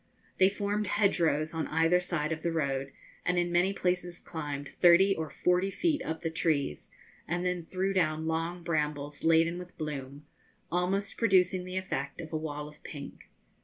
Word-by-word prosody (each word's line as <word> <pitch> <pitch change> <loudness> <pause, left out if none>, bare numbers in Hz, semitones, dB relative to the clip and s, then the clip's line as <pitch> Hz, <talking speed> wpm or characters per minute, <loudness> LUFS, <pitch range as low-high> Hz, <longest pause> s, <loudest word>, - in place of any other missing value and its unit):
They 190 0 +7
formed 205 +1 -1
hedgerows 170 -7 +2
on 160 -1 -2
either 165 +3 +3
side 170 -4 -2
of 160 0 -2
the 170 - 0
road, 135 -4 -1 0.3
and 180 0 +1
in 175 0 +1
many 175 +2 +3
places 180 -2 -1
climbed 145 -3 -5
thirty 185 +5 +5
or 160 -1 -3
forty 180 +2 +1
feet 305 - 0
up 160 0 -4
the 165 - -2
trees, 150 - 0 0.4
and 175 +2 -1
then 180 -1 -1
threw 190 +3 -1
down 160 -4 +1
long 165 +2 -2
brambles 150 -3 -2
laden 165 +1 +4
with 180 0 -11
bloom, 145 -2 -5 0.5
almost 190 +3 0
producing 185 -4 +3
the 185 0 -4
effect 140 -7 -3
of 160 -1 -7
a - - 0
wall 150 -1 -4
of 150 0 -15
pink. 145 -2 -9
170 Hz, 170 wpm, -30 LUFS, 155-180 Hz, 0.5 s, They